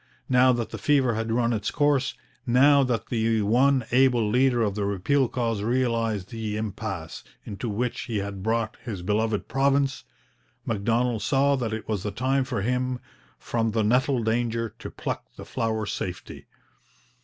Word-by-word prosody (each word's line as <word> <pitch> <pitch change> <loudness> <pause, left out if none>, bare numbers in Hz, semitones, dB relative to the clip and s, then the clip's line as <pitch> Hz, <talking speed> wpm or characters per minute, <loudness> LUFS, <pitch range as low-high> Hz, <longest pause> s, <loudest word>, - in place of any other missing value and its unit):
Now 130 0 +5
that 120 -2 -3
the - - -6
fever 135 -5 +3
had 110 +1 -2
run 120 0 +1
its 105 -2 -1
course, 145 -2 +1 0.3
now 140 +4 +5
that 125 -3 -2
the 110 -2 +1
one 130 +4 +3
able 125 -3 +4
leader 125 +1 +3
of 105 -2 0
the 105 0 -2
repeal 100 +8 +1
cause 115 -4 -2
realized 115 -4 0
the 110 -2 -3
impasse 100 -6 -5 0.2
into 110 +3 -5
which 120 +4 -2
he 115 -3 -3
had 100 -1 -4
brought 110 +1 -1
his 100 -7 -5
beloved 105 +2 0
province, 135 0 +1 0.6
Macdonald 115 +1 0
saw 140 0 +2
that 120 -4 -2
it 110 0 -5
was 105 -4 -1
the 105 - -3
time 130 +6 0
for 125 -7 -3
him 125 +1 -1 0.4
'from 115 -1 -1
the 110 -1 +1
nettle 125 +3 +2
danger 115 -1 -1
to - - -7
pluck - - -5
the - - -9
flower 110 -1 -2
safety.' 95 -2 -6
115 Hz, 165 wpm, -25 LUFS, 110-130 Hz, 0.6 s, Now